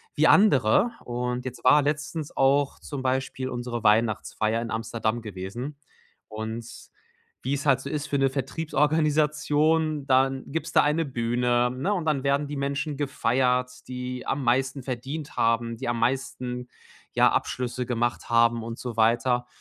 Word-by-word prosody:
wie - - +4
andere. 195 - +5
Und 125 +1 -3
jetzt 125 -1 -7
war 150 +3 +7
letztens 150 +1 -2
auch 140 +1 +2
zum 140 -3 -6
Beispiel 130 0 -1
unsere 120 -2 -4
Weihnachtsfeier 110 +1 +1
in 115 - -5
Amsterdam 115 0 -2
gewesen 110 +7 -6 0.5
und 110 +2 -5 0.8
wie 130 - -1
es 140 - -5
halt 135 -2 +3
so 140 - -6
ist 150 0 -3
für 145 - 0
'ne 135 - +3
Vertriebsorganisation, 150 +1 +1
dann 135 0 +2
gibt's 160 +1 -3
da - - +5
eine 150 +3 +2
Bühne, 120 -1 +1
ne, 135 +11 -1
und 180 -5 -2
dann 150 -4 0
werden 140 +1 +1
die 145 - -5
Menschen 140 +1 -2
gefeiert, 125 -2 +1 0.2
die 125 0 -5
am 140 0 -1
meisten 130 +2 +1
verdient 135 +4 -5
haben, 115 0 +1
die - - -5
am 120 -1 -1
meisten 125 0 -2 0.4
ja, - - +5
Abschlüsse 125 0 -2
gemacht 120 -1 -1
haben 115 0 +3
und 115 0 -6
so 120 -2 -5
weiter. 120 +2 +2
130 Hz, 155 wpm, -26 LUFS, 120-145 Hz, 0.8 s, war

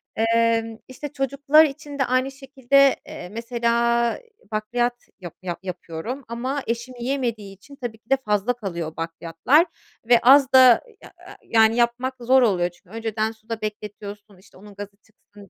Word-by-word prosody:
Emm, 225 0 +1
işte, 260 +3 -7
çocuklar 280 +3 +4
için 290 -1 -7
de 270 - +3
aynı 255 +2 0
şekilde, 275 0 +2
eee, 180 - -8
mesela, 235 +1 0
iii, 485 - -25 0.2
bakliyat 240 +3 -1 0.3
yap 175 -3 -8
yap 175 -2 -4
yapıyorum 185 +8 -6
ama 255 +4 -3
eşim 235 +2 -4
yiyemediği 235 -6 -3
için, 280 +9 -16
tabii 240 -5 -6
ki 225 - -39
de, 270 - +4
fazla 210 +3 +1
kalıyor 170 -9 -6
bakliyatlar 165 - +1 0.4
ve 240 -1 +7
az 270 +1 +6
da 255 -2 +7
i - - -18
ya - - -15
ya - - -12
yani 225 0 +3
yapmak 240 +2 +1
zor 260 +2 +4
oluyor 185 -7 +2
çünkü 180 +1 -26
önceden 220 -1 -2
suda 220 0 -8
bekletiyorsun, 210 -1 -7
işte, 190 0 -20
onun 205 +1 -14
gazı 200 0 -9
çıksın 205 -2 -20
230 Hz, 165 wpm, -23 LUFS, 205-260 Hz, 0.4 s, ve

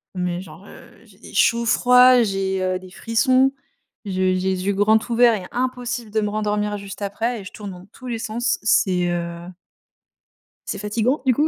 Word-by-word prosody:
Mais 180 0 -2
genre, 170 +2 -13
heu, - - -14
j'ai - - -21
des - - -13
chauds-froids, 250 +1 +5
j'ai, 190 -2 -1
heu, 185 0 -1
des 185 0 -13
frissons, 255 +6 +2 0.5
je 195 - -5
j'ai 185 0 +1
les 185 0 -1
yeux 200 - +1
grands 210 +3 +4
ouverts 235 0 +4
et 180 - -9
impossible 245 -2 -3
de 220 +1 0
me 210 - -1
rendormir 210 -1 -1
juste 200 +1 -8
après, 225 +3 -2
et - - -11
je 195 - -10
tourne 205 -2 -8
dans 180 -1 -11
tous 255 - -11
les 235 - -3
sens, 235 +2 -1
c'est 190 -5 +2
heu 170 0 -4 1.2
c'est - - -3
fatigant 220 +7 -1
du 255 - +4
coup, 300 +6 +1
210 Hz, 190 wpm, -21 LUFS, 185-235 Hz, 1.2 s, chauds-froids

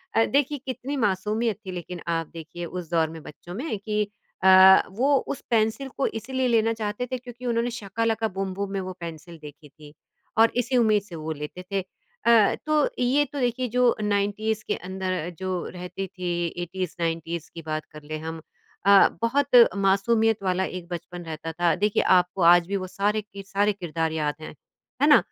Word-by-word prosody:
अ, 225 - +5
देखिए 285 +1 +1
कितनी 260 +2 -4
मासूमियत 210 0 0
थी 185 - -5
लेकिन 180 0 -6
आप 165 -2 -1
देखिए 165 +1 -7
उस 175 -1 -6
दौर 160 -2 +2
में 160 -1 -9
बच्चों 175 +4 -11
में 240 - -3
कि 210 0 -1 0.4
अ, 190 0 +9
वो 270 +7 +2
उस 275 - -4
पेंसिल 225 +4 +1
को 275 - +1
इसलिए 260 +3 -2
लेना 230 -1 +3
चाहते 220 +2 -3
थे 255 - -1
क्योंकि 245 0 -11
उन्होंने 235 0 0
शाका 225 -1 -4
लाका 225 0 +1
बूम 190 -1 -4
बूम 200 0 -4
में 195 - -1
वो 185 0 -5
पेंसिल 165 0 -8
देखी 150 0 -12
थी 150 0 -15 0.4
और 225 +1 +6
इसी 250 +1 +1
उम्मीद 215 -3 +4
से 180 -5 -10
वो 160 0 -5
लेते 150 +4 -6
थे। 195 -1 +1
अ, 235 - +1
तो 305 -1 +2
ये 265 +4 +3
तो 285 +1 -7
देखिए 250 0 0
जो 250 0 +3
90s 210 +1 0
के - - 0
अंदर 185 -2 -3
जो 185 -2 -2
रहती 180 +2 -6
थी, 175 -2 -2 0.2
80s-90s 170 -2 -3
की 165 - -7
बात 155 -1 -4
कर 150 0 -11
लें 155 +1 -5
हम 160 0 -6 0.4
अ, 200 -1 +8
बहुत 270 +4 +2 0.3
मासूमियत 205 +2 +2
वाला 185 0 +1
एक 180 -2 -7
बचपन 175 +1 -6
रहता 160 0 -5
था। 170 +1 +2
देखिए 205 +2 +1 0.2
आपको 180 +1 -4
आज 170 0 +6
भी 200 - -2
वो 185 -1 -5
सारे 205 +3 0
के 200 -1 -11
सारे 205 +2 +1
किरदार 165 -4 -2
याद 150 -2 -1
हैं। - - -8 0.5
है - - +5
ना? - - +9
195 Hz, 190 wpm, -25 LUFS, 170-225 Hz, 0.5 s, अ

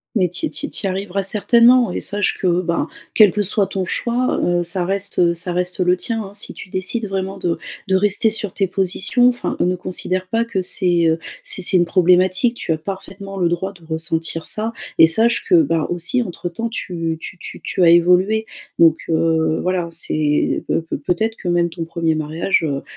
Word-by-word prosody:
Mais 185 -5 +2
tu 180 - -1
y 310 - -3
tu - - -3
y - - -10
tu - - -2
y - - +2
arriveras 195 +1 -3
certainement, 235 +3 +4
et - - -3
sache 205 -1 0
que, 180 -1 +1
ben, 170 -1 -1 0.3
quel 210 -4 +6
que 210 - 0
soit 200 0 0
ton 190 0 -3
choix, 245 +6 -1
heu, 175 0 +1
ça 175 +1 0
reste, 200 +1 -2
heu, 170 -1 +3
ça 175 +2 0
reste 180 +1 -2
le 180 0 +2
tien, 225 +2 -2
hein. 195 0 -11
Si 205 - -3
tu - - -11
décides 190 +5 -2
vraiment 195 0 -4
de 175 -3 -2 0.3
de 190 - +3
rester 205 +2 +3
sur 210 -3 -2
tes 195 - 0
positions 195 +6 +1
enfin, 245 -1 -3
ne 180 +1 +1
considère 185 +1 -3
pas 230 +4 0
que 200 -5 -2
c'est, 175 -2 +1
heu, 160 0 +1 0.2
c'est 190 - +2
c'est 185 - +4
une 175 - +3
problématique. 185 +6 +3
Tu 165 - -4
as 160 - +1
parfaitement 195 +3 -8
le 175 -2 +1
droit 190 +3 -3
de 175 -3 -19
ressentir 160 0 -1
ça 220 +2 +1 0.3
et 160 - +9
sache 225 +8 +3
que, 365 - +2
bah, 165 - 0
aussi, 175 +8 0
entre 175 -2 -6
temps, 230 +7 -4
tu 165 -7 -4
tu 180 - -9
tu - - -9
tu 180 - -1
as 170 - +6
évolué 180 +6 +3 0.3
donc, 165 -1 +5
heu, 160 -1 +1
voilà. 180 -2 -1
C'est 155 -2 0
peut - - 0
peut 165 - -5
peut-être 200 +9 -2
que 180 - -5
même 175 0 +1
ton 165 0 -6
1er 165 -1 -1
mariage, 155 +4 -1
heu, 140 -3 -2
185 Hz, 215 wpm, -19 LUFS, 170-200 Hz, 0.3 s, et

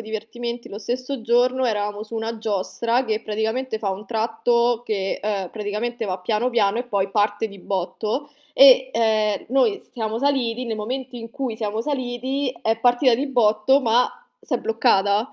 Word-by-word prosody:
divertimenti, 235 +2 -5
lo 205 - -7
stesso 255 +3 -3
giorno, 245 +3 +2
eravamo 210 -2 -2
su 220 +1 -9
una 225 +1 -3
giostra 225 +3 -1
che 220 -1 -1
praticamente 220 +3 -2
fa 200 -3 -1
un 190 +2 -5
tratto 235 +2 +1
che, 195 -4 -2
uhm, 200 -3 -2
praticamente 220 +3 -3
va 190 -2 -3
piano 215 +6 0
piano 225 -2 +2
e - - 0
poi 200 -5 -1
parte 205 +1 +1
di 200 -1 -12
botto 205 +9 -3 0.2
e, 260 -2 +7
ehm, 215 -2 +1
noi 275 - +2
siamo 220 -2 -3
saliti, 255 -3 0
nel 225 -2 -3
momento 255 +4 -4
in 230 -1 -8
cui 250 -3 -4
siamo 215 0 -2
saliti 260 0 -2
è 225 0 +1
partita 245 +1 +4
di 270 +5 -1
botto 240 +1 +3
ma 240 0 +3 0.3
s'è 250 - -1
bloccata, 220 -1 +2
230 Hz, 165 wpm, -22 LUFS, 215-250 Hz, 0.3 s, e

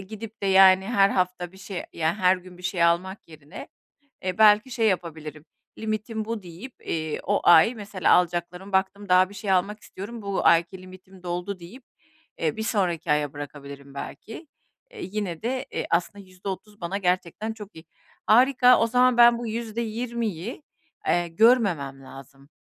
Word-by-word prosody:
gidip 215 +3 -10
de, 195 - 0
yani, 190 0 +6
her 200 -4 +3
hafta 180 -1 -2
bir 190 - -16
şey, 195 -2 -6
ya, 160 0 0
her 185 -2 +3
gün 180 0 -14
bir - - -14
şey 180 -2 -1
almak 180 +3 0
yerine, 150 -2 -11 0.6
eee, 185 +1 -3
belki 215 +3 +5
şey 225 -2 +1
yapabilirim, 160 -4 -4 0.3
limitim 215 0 -3
bu 225 -3 -5
deyip, 180 +9 -10
iii, 155 -1 -3
o 205 +1 0
ay 175 +8 +6
mesela 205 -3 0
alacaklarım 180 +2 0
baktım 190 +1 -1
daha 185 +1 +5
bir 205 - -13
şey 195 0 -3
almak 195 +3 0
istiyorum, 215 +3 -9
bu 200 -1 -3
ayki 170 +3 +2
limitim 185 0 -15
doldu 180 +2 -4
deyip, 230 +10 -13 0.5
eee, 160 +3 -2
bir 220 - -3
sonraki 180 -8 -1
aya 150 -1 0
bırakabilirim 140 -1 -10
belki. 225 - -9 0.4
Eee, 455 -4 -9
yine 190 -4 -4
de, 255 +4 -3
eee, - - -3
aslında 185 +4 -1
%30 190 +2 -8
bana 180 +4 -3
gerçekten 185 +3 -2
çok 210 -2 -12
iyi. 160 +1 -13 0.4
Harika, 250 +2 +5
o 230 - +2
zaman 250 +1 +3
ben, 240 0 +7
bu 240 - -5
%20'yi, 230 - -4 0.4
eee, 175 0 +1
görmemem 170 - +2
lazım, 135 +1 -14
190 Hz, 165 wpm, -25 LUFS, 175-220 Hz, 0.6 s, ben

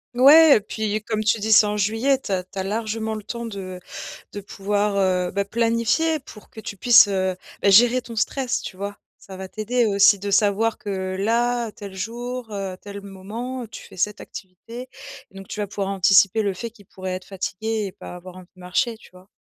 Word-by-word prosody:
Ouais 290 +4 +8
et 210 - +2
puis 215 0 -3
comme 215 -1 -2
tu 220 +1 +3
dis, 220 +1 -1
c'est 215 0 +8
en 210 0 -1
juillet, 225 +7 +1
tu 260 - -8
as 185 -1 0
tu 190 - -14
as 190 - -1
largement 220 +2 -2
le 215 - -6
temps 235 +2 -5
de 190 -4 -7 0.5
de 205 - -5
pouvoir, 205 +1 -1
heu, 185 -2 +1
bah, 200 +1 -1
planifier 230 +9 +1
pour 225 -6 -15
que - - -16
tu 205 - -7
puisses, 230 +3 +7
heu, 190 -2 -1 0.3
bah, 200 - +5
gérer 240 +5 +6
ton 230 -1 -10
stress, 255 +3 0
tu - - -8
vois? 200 +1 -6 0.2
Ça 190 -1 -11
va 190 - -6
t'aider 230 +3 0
aussi 200 0 +5
de 200 +1 -4
savoir 210 +2 +2
que 190 -5 -4
là, 235 +3 0
tel 200 -2 -10
jour, 240 +4 -5
heu, 195 -2 -4
tel 200 0 -8
moment, 225 +6 -6
tu - - -10
fais - - -15
cette 210 +3 -1
activité 230 +7 -10 0.4
et - - -28
donc 195 - -9
tu 210 - -6
vas 205 - -2
pouvoir 195 -1 -3
anticiper 195 +2 +4
le 200 -2 -1
fait 230 +5 -6
qu'il 210 -4 -20
pourrait 185 -1 -6
être 185 - -5
fatigué 210 +3 -3
et 190 - -7
pas 180 - -10
avoir 185 +1 -11
envie 185 -1 -13
de - - -16
marcher, 180 +6 -1
tu - - -18
vois? 185 +1 -17
210 Hz, 215 wpm, -23 LUFS, 195-230 Hz, 0.5 s, Ouais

